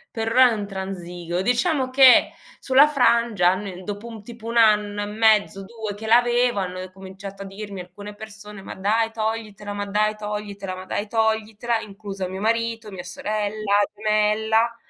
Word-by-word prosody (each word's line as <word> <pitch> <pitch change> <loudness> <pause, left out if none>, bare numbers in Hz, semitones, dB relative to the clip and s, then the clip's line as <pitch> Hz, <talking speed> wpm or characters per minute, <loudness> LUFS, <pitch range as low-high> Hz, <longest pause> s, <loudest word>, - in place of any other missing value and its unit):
Per 225 -1 -2
r 225 - -1 0.2
non 205 - -4
transigo. 180 -3 -5
Diciamo 260 - +1
che 260 -1 +7 0.3
sulla 275 +3 +5
frangia 235 -9 +3
almen 185 -1 -5
dopo 205 +3 -6
un 225 -3 -9
tipo 230 0 -11
1 235 +1 -2
anno 210 -2 +3
e - - -3
mezzo, 210 -2 +2
2 220 0 -6
che 220 +2 -8
l'aveva 240 -2 +3
hanno 185 0 -6
cominciato 195 +1 -10
a - - -9
dirmi 195 -1 -7
alcune 205 +3 -10
persone: 210 -1 -11
"Ma - - -7
dai 220 +4 0
toglitela, 220 -2 -4
ma 205 0 -3
dai 210 +1 0
toglitela, 205 -2 -5
ma 185 0 -9
dai 205 +2 -3
toglitela", 220 +1 0
incluso 195 -2 -6
mio 190 +1 -6
marito, 230 0 -1
mia 190 -3 -8
sorella 205 +2 -2 0.2
gemella, 215 +2 +1
210 Hz, 160 wpm, -23 LUFS, 195-225 Hz, 0.3 s, che